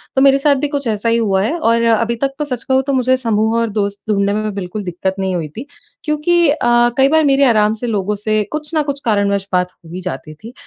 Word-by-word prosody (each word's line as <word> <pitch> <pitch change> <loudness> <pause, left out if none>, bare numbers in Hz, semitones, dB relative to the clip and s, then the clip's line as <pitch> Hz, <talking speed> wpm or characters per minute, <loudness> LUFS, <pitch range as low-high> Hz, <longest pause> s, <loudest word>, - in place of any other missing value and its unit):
तो 265 - +3
मेरे 275 0 +6
साथ 280 0 +3
भी - - 0
कुछ 285 -3 -3
ऐसा 220 +1 -1
ही 230 - +2
हुआ 195 -4 +1
है 320 +10 -1
और 230 -6 +1
अभी 230 +2 0
तक 270 0 0
तो 300 - -1
सच 250 -4 -4
कहूँ 265 0 +2
तो 275 - 0
मुझे 260 0 +2
समूह 225 -2 0
और 230 - 0
दोस्त 200 0 -2
ढूँढ़ने 200 -1 +1
में 215 -1 -2
बिल्कुल 200 +2 -5
दिक्कत 190 +1 -3
नहीं 190 -1 -1
हुई 165 -3 -3
थी 255 - -6 0.4
क्योंकि 315 +2 +2
अ, 295 - +2 0.4
कई 270 0 +5
बार 315 0 +3
मेरे 275 0 +4
आराम 215 -3 +3
से 245 - -2
लोगों 210 -1 -1
से 215 +1 0
कुछ 300 +1 -3
न 310 - +2
कुछ 280 -1 -3
कारणवश 200 -2 0
बात 180 0 +1
हो 165 - -19
ही 185 - -5
जाती 165 -3 -6
थी। 225 +10 -12
230 Hz, 255 wpm, -17 LUFS, 200-275 Hz, 0.4 s, मेरे